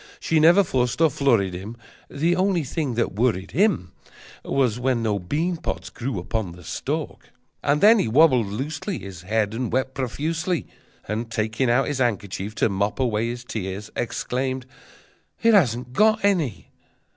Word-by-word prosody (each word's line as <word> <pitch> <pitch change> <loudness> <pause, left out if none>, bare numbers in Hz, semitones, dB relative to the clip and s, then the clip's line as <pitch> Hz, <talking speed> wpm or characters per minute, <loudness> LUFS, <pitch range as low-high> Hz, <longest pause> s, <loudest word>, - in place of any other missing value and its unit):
She 165 - +1
never 170 +6 +6
fussed 125 -7 -1
or 165 -2 +4
flurried 115 -10 +2
him, 100 +6 -7 0.3
The 165 +5 +1
only 185 -2 +1
thing 140 -2 -3
that 115 - 0
worried 105 -3 0
him 180 - +1 0.5
Was 125 -4 +1
when 125 -2 0
no 105 -2 0
bean 160 - -1
pods - - -5
grew 120 -2 -4
upon 90 0 -3
the 90 +1 -13
stalk! - - -4 0.3
But 145 +1 +1
then 220 +2 +7
he - - +1
wabbled 130 -2 +4
loosely 145 - -4
His 95 -3 -9
head, 105 +2 0
and 120 0 -3
wept 130 +1 0
profusely, 155 +7 -2 0.4
And, 110 +2 -3
taking 115 +3 -1
out 125 +3 +3
his 145 -2 -2
handkerchief 105 -3 -2
to - - +2
mop 100 +3 -1
away 115 -3 +1
his 120 0 -5
tears, 100 -3 -5
Exclaimed: 130 +2 -2 0.8
"It 230 0 +5
hasn't 125 - +2
got 215 +4 +3
any!" 155 - 0
125 Hz, 160 wpm, -23 LUFS, 105-155 Hz, 0.8 s, then